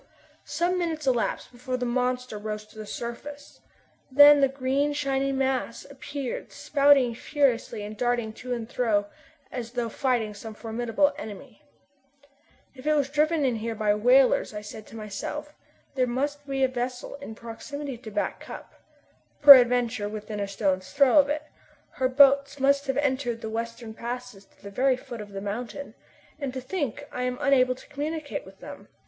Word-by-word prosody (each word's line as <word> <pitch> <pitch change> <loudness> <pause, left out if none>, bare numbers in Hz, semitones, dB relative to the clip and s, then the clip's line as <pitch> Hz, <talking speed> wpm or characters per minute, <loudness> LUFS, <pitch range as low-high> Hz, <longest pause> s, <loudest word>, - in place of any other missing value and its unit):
Some 360 +1 0
minutes 320 -4 -2
elapsed 250 -4 0
before 255 +1 -4
the 250 - -2
monster 250 -2 -1
rose 215 0 -5
to 215 +1 -19
the 215 - -7
surface. 285 +6 -7 0.5
Then 290 +1 +8
the 275 - +6
green 275 +2 0
shiny 275 -1 0
mass 265 -3 -1
appeared 275 -1 -6
spouting 280 -4 +3
furiously 250 -4 0
and 210 +1 -7
darting 240 -1 -1
to 250 +3 -8
and 235 -2 -3
fro 220 -4 +1 0.5
as 240 -2 -6
though 240 -2 -2
fighting 240 -2 0
with 210 - -11
some 220 0 -8
formidable 240 +6 0
enemy. 220 +2 -9 1.1
"If 265 +2 -10
it 305 - +4
was 280 -2 0
driven 305 0 +2
in 245 -3 +1
here 225 +1 -4
by 210 -1 +2
whalers," 245 +1 +4
I 210 - -4
said 210 +1 -10
to - - -13
myself, 225 +8 -6 0.4
"there 255 -2 +1
must 285 +4 -2
be 270 -1 0
a - - +5
vessel 250 0 -4
in 250 -6 -9
proximity 270 +5 -7
to 230 - -9
Back 205 -1 -2
Cup - - -10 0.7
peradventure 245 -5 +7
within 210 0 -6
a 200 - -2
stone's 190 -2 -1
throw 280 0 +5
of 285 0 +4
it. 300 +1 -1 0.5
Her 255 0 0
boats 280 +1 +5
must 280 +1 +2
have 270 0 -1
entered 260 -5 0
the 220 - -5
western 230 0 -5
passes 240 -3 -7
to - - -29
the 200 - -8
very 255 +4 +2
foot 245 -4 -8
of 205 -1 -10
the 195 0 -6
mountain. 235 +7 -5 0.5
And 280 -3 -3
to - - -2
think 285 - -3
I 250 - -4
am 250 0 -1
unable 255 -2 +3
to - - -15
communicate 305 +1 -4
with - - -16
them! - - -10
250 Hz, 175 wpm, -26 LUFS, 225-280 Hz, 1.1 s, Then